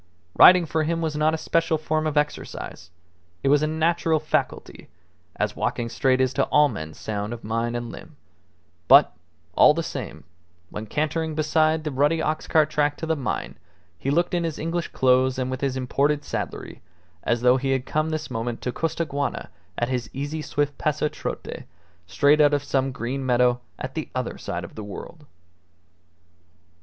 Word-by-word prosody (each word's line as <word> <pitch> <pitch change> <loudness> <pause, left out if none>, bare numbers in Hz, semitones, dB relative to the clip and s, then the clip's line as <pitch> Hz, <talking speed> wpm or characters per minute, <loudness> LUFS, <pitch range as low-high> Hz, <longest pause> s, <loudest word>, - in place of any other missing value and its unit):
Riding 180 -1 +8
for 160 0 -1
him 165 +2 0
was 160 -2 -2
not 155 +1 +2
a - - -3
special 165 0 +1
form 155 0 -1
of 150 -1 -2
exercise; 150 - -3 0.5
it 135 - +2
was 145 +1 +5
a 155 - +1
natural 160 0 +1
faculty, 155 - -3 0.5
as - - -1
walking 115 -1 -2
straight 130 +1 +1
is 130 -1 +2
to - - +2
all 150 0 +4
men 80 - -7
sound 105 +1 -4
of 120 - -9
mind 115 +2 -2
and 120 -1 -4
limb; - - -11 0.7
but, - - +7 0.4
all 150 - +6
the 165 - -1
same, 110 - -6 0.5
when 110 +1 -6
cantering 155 +4 -1
beside 155 +1 +2
the 155 - -3
rutty 145 +5 +2
ox 155 0 -2
cart 155 -1 +3
track 145 -1 +1
to - - -4
the 160 0 +1
mine 135 -4 -4 0.4
he 130 - -4
looked 175 +5 +1
in 175 -1 +1
his 165 -2 -3
English 165 +1 -2
clothes 130 0 +2
and 130 0 -2
with 130 - -4
his 135 -2 -1
imported 140 +3 0
saddlery - - -5 0.4
as 120 0 0
though 125 +1 +5
he 135 +1 -2
had 135 -1 0
come 155 +3 0
this 155 -3 -4
moment 115 0 -3
to 125 - -1
Costaguana 145 -2 -2 0.3
at 120 - 0
his 125 -4 -2
easy 145 +3 -4
swift 145 -1 -2
pasotrote, 150 0 -3 0.4
straight 145 +9 +4
out 145 0 +5
of 145 - -2
some 135 -1 0
green 125 +2 -4
meadow 125 -1 +2 0.2
at 130 0 -6
the 160 - -4
other 130 -2 -3
side 85 0 -4
of 85 - -9
the 110 - -7
world. 145 +9 -9
145 Hz, 180 wpm, -24 LUFS, 125-155 Hz, 0.7 s, Riding